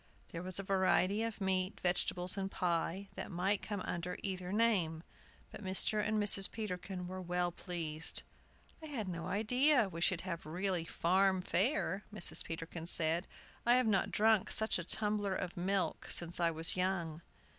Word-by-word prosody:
There 165 - -6
was 185 -1 -4
a 200 - -1
variety 195 +1 +2
of 230 -1 -3
meat, 190 0 0
vegetables, 180 0 +1
and 195 -1 -3
pie, 180 +2 -1
that - - -6
might 190 +3 0
come 205 -2 -4
under 180 0 -4
either 185 -2 -4
name; 195 -8 +1 0.5
but - - -9
Mr. 195 +3 +1
and 215 0 0
Mrs. 205 -2 +4
Peterkin 185 -4 -5
were 185 +1 -6
well 180 0 -1
pleased. 165 -3 -3 0.6
"I 315 - -8
had 245 -9 -4
no 170 -1 -4
idea 240 +4 +3
we 170 -2 -7
should 180 -1 +2
have 170 -4 -5
really 180 +1 -1
farm 190 +3 +2
fare," 195 - 0
Mrs. 210 -4 +2
Peterkin 165 0 -6
said. 170 +1 +3 0.4
"I 240 +1 +5
have 255 0 +3
not 205 -3 +2
drunk 220 -2 +3
such 220 -3 +4
a - - -4
tumbler 205 +1 0
of 180 -2 -4
milk 190 +2 -1
since 170 0 +2
I 170 -1 +3
was 165 0 0
young." 175 -4 -1
185 Hz, 165 wpm, -34 LUFS, 175-205 Hz, 0.6 s, I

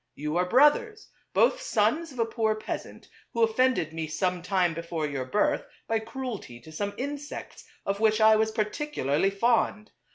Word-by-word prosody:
You 150 +2 -3
are 180 0 +1
brothers; 425 - +3 0.2
both - - +3
sons 335 -9 +1
of 260 - -13
a 230 - +2
poor 220 -1 0
peasant 215 - -7 0.3
who 230 - +2
offended 225 - +2
me 160 -1 -3
some 180 +3 -1
time 180 -2 +1
before 165 -1 -3
your 140 -3 -3
birth, 205 +11 +1 0.2
by 225 0 +1
cruelty 220 - -6
to 160 - -13
some 200 +6 -3
insects 285 +2 -6 0.2
of 200 0 -1
which 215 0 +3
I 220 0 +7
was 220 0 +2
particularly 210 - 0
fond. 220 +1 +1
215 Hz, 165 wpm, -27 LUFS, 175-250 Hz, 0.3 s, I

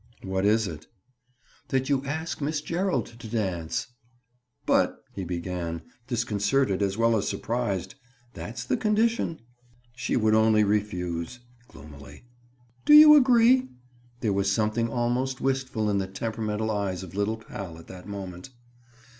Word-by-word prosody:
"What 95 0 -1
is 110 +1 +3
it?" 80 -2 -8 0.8
"That 130 0 0
you 140 -2 +1
ask 160 +2 -4
Miss 150 +2 -1
Gerald 175 +5 -1
to 115 - -8
dance!" 95 -8 -2 0.8
"But—" - - +2 0.2
he 95 - -5
began, 85 -1 -4 0.2
disconcerted 110 -2 0
as 100 0 0
well 115 0 +3
as 105 - 0
surprised. 110 -7 -2 0.4
"That's 115 +2 -6
the - - 0
condition." 215 - +1 0.5
"She 120 - -1
would 110 -2 +3
only 110 -1 +4
refuse." 100 -1 -2 0.3
Gloomily. 70 - -13 0.6
"Do 300 - +7
you 300 0 +11
agree?" 255 -1 +5 0.5
There 110 -4 +1
was 100 0 +1
something 110 +3 0
almost 125 +2 -1
wistful 130 -5 -1
in 100 -1 +1
the 95 - -2
temperamental 110 +2 -3
eyes 100 -3 -2
of 90 -2 -10
little 100 +3 -1
pal 95 -6 -8
at 85 - -13
that 90 0 -11
moment. 95 +1 -7
110 Hz, 140 wpm, -26 LUFS, 95-130 Hz, 0.8 s, you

